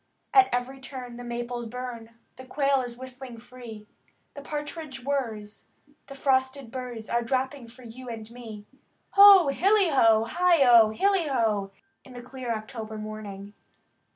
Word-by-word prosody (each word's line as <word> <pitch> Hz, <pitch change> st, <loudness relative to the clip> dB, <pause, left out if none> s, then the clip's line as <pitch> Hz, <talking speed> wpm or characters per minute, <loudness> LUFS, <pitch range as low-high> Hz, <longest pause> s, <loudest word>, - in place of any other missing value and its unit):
At 395 Hz, -1 st, +6 dB
every 245 Hz, +2 st, -3 dB
turn 250 Hz, -2 st, -8 dB
the 245 Hz, -, -8 dB
maples 240 Hz, 0 st, -5 dB
bum, 240 Hz, -1 st, -7 dB, 0.3 s
The 260 Hz, -, -11 dB
quail 275 Hz, 0 st, +1 dB
is 240 Hz, -1 st, -7 dB
whistling 255 Hz, -1 st, -9 dB
free. 230 Hz, -3 st, -11 dB, 0.5 s
The 285 Hz, -, -9 dB
partridge 295 Hz, -2 st, -6 dB
whirs, 225 Hz, -7 st, -4 dB, 0.2 s
and 290 Hz, 0 st, -29 dB
the 275 Hz, -, -10 dB
frosted 260 Hz, -2 st, 0 dB
burrs 245 Hz, -3 st, -7 dB
Are 235 Hz, -, 0 dB
dropping 260 Hz, +1 st, -2 dB
for 245 Hz, +2 st, -16 dB
you 245 Hz, +2 st, -10 dB
and 225 Hz, -2 st, -7 dB
me. 225 Hz, -4 st, -10 dB, 0.5 s
Ho! 395 Hz, -5 st, +8 dB
hilly 390 Hz, +6 st, +3 dB
ho! 225 Hz, -5 st, +4 dB
heigh 345 Hz, +4 st, +3 dB
O! 230 Hz, -3 st, +7 dB
Hilly 380 Hz, -, +1 dB
ho! 220 Hz, -7 st, 0 dB, 0.3 s
In 260 Hz, -, -15 dB
the 245 Hz, 0 st, -9 dB
clear 250 Hz, -1 st, -6 dB
October 220 Hz, -1 st, -6 dB
morning. 210 Hz, -2 st, -8 dB
250 Hz, 155 wpm, -26 LUFS, 225-275 Hz, 0.5 s, Ho